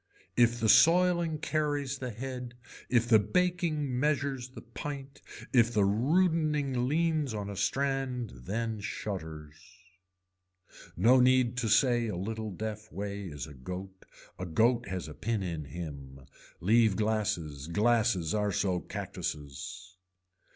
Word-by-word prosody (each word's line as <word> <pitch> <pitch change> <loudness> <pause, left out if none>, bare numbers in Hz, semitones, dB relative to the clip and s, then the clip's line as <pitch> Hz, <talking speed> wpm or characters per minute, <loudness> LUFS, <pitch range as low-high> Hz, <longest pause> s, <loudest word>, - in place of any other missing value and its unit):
If 120 0 +4
the 115 - +1
soiling 170 +3 +5
carries 145 -3 -1
the 130 - -4
head, 125 +1 -6 0.3
if 120 -2 +3
the 110 -2 +6
baking 155 - 0
measures 140 -3 0
the 130 - -11
pint, 135 +3 -7 0.3
if 120 -2 +5
the 105 -3 +3
rudening 145 - +2
leans 155 -4 +1
on 100 -1 -4
a - - -6
strand 130 +2 -1 0.2
then 110 +2 -2
shutters. 80 -7 -6 1.4
No 120 +8 +6
need 125 -1 +4
to 120 -2 0
say 120 +1 +3
a 105 - -3
little 110 +3 -4
deaf 105 +2 -6
way 100 0 -5
is 75 -5 -6
a 75 - -11
goat, 90 +8 -8 0.3
a 90 - -4
goat 115 +8 +2
has 95 -3 -4
a 75 - -8
pin 110 +4 -2
in 85 -5 -4
him. 70 -5 -8 0.4
Leave 110 +1 +4
glasses, 105 -10 -1
glasses 105 -2 +2
are 105 -1 +1
so 95 -1 0
cactuses. 85 +6 -6
115 Hz, 130 wpm, -30 LUFS, 95-130 Hz, 1.4 s, the